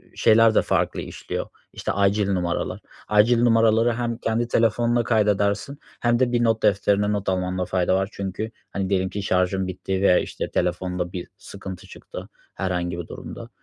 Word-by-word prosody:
şeyler 110 0 +5
de - - +5
farklı - - 0
işliyor, - - -5 0.3
işte, - - -3
acil 100 0 +2
numaralar. 90 -3 -1 0.3
Acil 110 +3 +4
numaraları 115 0 +4
hem 120 0 -2
kendi 115 +1 -1
telefonuna 120 +1 +2
kaydedersin 105 +4 +1 0.2
hem 120 0 +2
de 130 -2 +2
bir 120 -1 +2
not 115 -1 +1
defterine 105 +1 +2
not 100 -2 -1
almanda 90 0 -1
fayda 90 0 +1
var. 95 +1 0
Çünkü, 100 +3 -4 0.2
hani, 95 -1 -2
diyelim 95 -1 +1
ki, 100 +1 -5
şarjın 95 0 +1
bitti 95 +1 -3
veya, 90 -2 +5
işte, - - -4
telefonda 90 0 -2
bir 90 -2 -5
sıkıntı 95 -1 -9
çıktı - - -10 0.2
herhangi 90 -2 -2
bir 85 - -6
durumda. - - -9
100 Hz, 165 wpm, -23 LUFS, 95-115 Hz, 0.3 s, şeyler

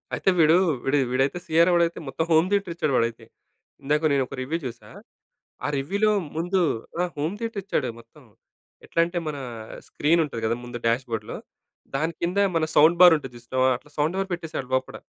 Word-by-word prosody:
అయితే - - +1
వీడూ, 160 0 +6 0.3
వీడు 135 +2 +2
వీడైతే 135 +6 +1
సీయరా 165 +3 +4
వాడైతే 170 0 +1
మొత్తం 135 +4 -2
హోమ్ 160 +2 +5
థియేటర్ 200 -4 0
ఇచ్చాడు 155 -4 -1
వాడైతే. 115 0 -1 0.6
ఇందాక 150 +3 +1
నేను 135 - +2
ఒక - - -8
రివ్యూ 145 +6 -2
చూసా. 120 -2 -8 0.8
ఆ - - +1
రివ్యూలో 200 +10 +1 0.3
ముందు 175 +3 0 0.4
ఆ! - - +2
హోమ్ 155 +7 -2
థియేటర్ 225 -3 -4
ఇచ్చాడు 145 -9 -1
మొత్తం. 115 - -18 0.6
ఎట్లా - - -3
అంటే, 175 +1 -5
మన 150 - -3 0.5
స్క్రీన్ 165 +3 +2
ఉంటది 135 -7 -5
కదా, 115 +1 +1
ముందు 120 0 -6
డాష్‌బోర్డ్‌లో, 115 -1 -2 0.6
దానికింద 170 +5 -1 0.2
మన 160 -1 +2
సౌండ్ 160 +3 +6
బార్ 180 -2 +10
ఉంటది 135 -4 -9
చూసినవా, 130 +2 0
అట్లా 150 - -22
సౌండ్ 155 +4 +1
బార్ 195 0 -2
పెట్టేసాడు 160 -6 -5
లోపట. 130 0 -1
155 Hz, 170 wpm, -24 LUFS, 130-170 Hz, 0.8 s, బార్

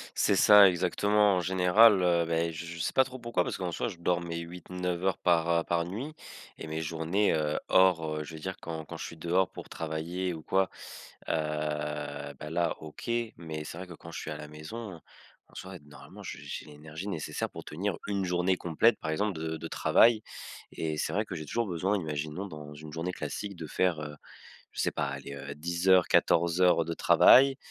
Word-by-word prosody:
C'est - - +3
ça, 105 -2 +8
exactement! 100 +3 +2
En - - +1
général, 95 +3 +5
heu, 85 -1 +3
beh, 85 0 0
j 85 +1 -7
je 85 0 -7
sais - - -1
pas 130 - +5
trop 130 0 -9
pourquoi, 120 -7 -1
parce - - -4
qu'en 90 -2 -3
soit 120 - -2
je 90 - -9
dors 85 0 0
mes 85 -1 -5
8-9 90 +1 -4
heures 95 -2 +1
par, 85 -1 +2
heu, 85 0 +3
par 85 -1 0
nuit 120 - -5 0.5
et - - -7
mes 80 +1 -3
journées, 80 +6 0
heu, 75 -1 0
hors, 80 -5 +3
heu, 75 - -3
je 80 - -9
veux - - -8
dire 95 +4 -5
quand 80 -1 -6
quand - - -8
je - - -6
suis 85 - -9
dehors 90 +3 +1
pour - - -10
travailler 85 +3 -3
ou 80 - -10
quoi 95 0 +1 0.6
heu, - - +1 1.1
bah, 75 - -7
là 85 -1 0
OK. 80 +8 -9 0.3
Mais 80 -2 -6
c'est 85 - -7
vrai, 95 - -7
que 85 - -9
quand 85 - -12
je - - -6
suis - - -6
à 75 - -5
la 75 - -8
maison 85 +5 -8 0.5
en - - -22
soi, 95 -1 -8
normalement 75 - -13
je - - -6
j'ai - - -7
l'énergie 75 +5 -9
nécessaire 80 -6 -3
pour - - -9
tenir 90 +4 -3
1 100 -1 -1
journée 90 +1 +1
complète 90 +8 +2
par 80 - -4
exemple 100 +1 -1
de 80 0 -3
de 80 +1 -6
travail 115 +4 +4 0.5
et 80 -1 -3
c'est - - -1
vrai 105 +3 0
que 95 - -6
j'ai 80 -2 -6
toujours 115 +6 -1
besoin, 95 +4 0
imaginons 80 +2 -4
dans 75 -4 -9
une 75 0 -10
journée 85 +3 -3
classique, 100 +7 -5
de 80 -2 -7
faire, 90 -2 +1
heu, 75 -1 -7 0.6
je - - -3
sais - - +1
pas, - - -1
aller, 70 - -6
heu, 70 +1 -7
10.00-14:00 85 0 +3
de 85 - -3
travail 135 +9 +6
85 Hz, 210 wpm, -29 LUFS, 80-95 Hz, 1.1 s, ça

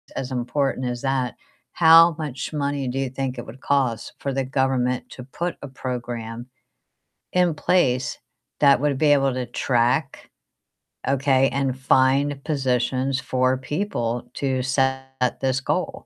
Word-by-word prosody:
as 130 0 -4
important 130 +1 -1
as 120 -1 -3
that. 135 -3 -1 0.4
How 165 0 +7
much 145 -1 -5
money 140 -2 -1
do 130 +2 -2
you 135 -2 -1
think 130 -1 -4
it - - -6
would 120 +4 -11
cost 130 -5 0
for 140 - -2
the 135 0 0
government 130 -1 0
to 125 - -9
put 170 +7 -4
a - - -5
program 120 -3 -5 0.9
in 180 -3 +3
place 130 -6 +1 0.4
that 140 -3 +5
would 145 -2 +1
be 150 +1 +3
able 135 -1 +2
to 125 -1 -3
track, 120 0 0 0.8
okay, 135 0 +3
and 135 0 -1
find 135 +2 +2
positions 130 -2 0
for 130 0 +1
people 130 - -3
to 130 -2 -1
set 135 -1 -1
this 130 -1 +1
goal? - - -1
130 Hz, 140 wpm, -23 LUFS, 125-140 Hz, 0.9 s, How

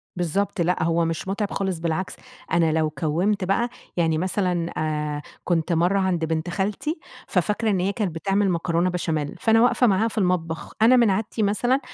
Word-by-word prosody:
بالضبط، 180 +2 -1
لأ 175 0 +1
هو 165 0 +2
مش 165 +3 -3
متعب 200 +1 -2
خالص 190 -4 -2
بالعكس، 170 +3 -2 0.4
أنا 165 -2 +3
لو 155 -1 +1
كوّمت 170 +8 0
بقى 195 +6 +1 0.3
يعني 160 -2 +2
مثلًا 180 -1 -1
آآ، 150 -1 -2 0.2
كنت 170 -1 0
مرّة 175 +4 +2
عند 180 -4 0
بنت 160 +2 -2
خالتي، 210 - -2 0.3
ففاكرة 210 +5 0
إن 195 -3 +1
هي 190 +2 +1
كانت 195 -8 -2
بتعمل 195 +4 +1
مكرونة 170 +1 +1
بشاميل، 160 -5 -2
فأنا 225 0 +4
واقفة 245 0 +4
معاها 205 +3 +3
في 225 - -8
المطبخ، 175 -4 -1
أنا 235 +3 +7
من 235 -3 +5
عادتي 210 +2 -1
مثلًا 240 +6 +2
180 Hz, 175 wpm, -24 LUFS, 165-205 Hz, 0.4 s, أنا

